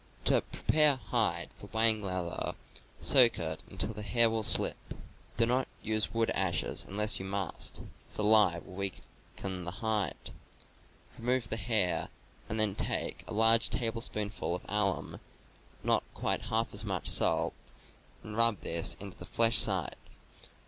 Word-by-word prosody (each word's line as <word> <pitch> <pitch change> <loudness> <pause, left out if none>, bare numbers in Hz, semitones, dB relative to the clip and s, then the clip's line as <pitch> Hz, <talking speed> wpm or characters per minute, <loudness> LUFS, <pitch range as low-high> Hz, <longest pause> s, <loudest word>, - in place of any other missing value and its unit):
To - - +2
prepare 150 -2 +2
a - - -4
hide 130 - -1
for - - -11
whang 110 -1 +3
leather: 90 -3 -4 0.4
soak 120 -4 +5
it 80 -2 -5
until 110 - 0
the 105 - -8
hair 115 +1 +3
will 110 0 -1
slip. 105 - +5 0.4
Do 115 - +3
not 125 +2 0 0.2
use 110 -1 -1
wood 115 -1 -1
ashes - - -1
unless 105 +2 +2
you 95 - -7
must, 95 -2 -4 0.3
for 105 - -4
lye 105 -5 +5
will 95 - -13
weaken 95 -1 -7
the 85 - -5
hide. 110 -2 -2 0.9
Remove 120 -1 -1
the - - 0
hair, 110 -5 +1 0.4
and 110 - -3
then 105 -2 +1
take - - -3
a - - -7
large 115 +1 +5
tablespoonful 110 -5 -3
of 90 - -8
alum, 105 -2 -2
and - - -10 0.6
not - - +1
quite - - -2
half 115 +1 -1
as 100 +2 0
much 95 -4 -4
salt, - - +2 0.7
and 105 - -8
rub 115 -3 +2
this 85 0 -2
into 100 -2 -10
the - - -9
flesh 115 +5 +3
side. - - +1
110 Hz, 155 wpm, -30 LUFS, 95-115 Hz, 0.9 s, soak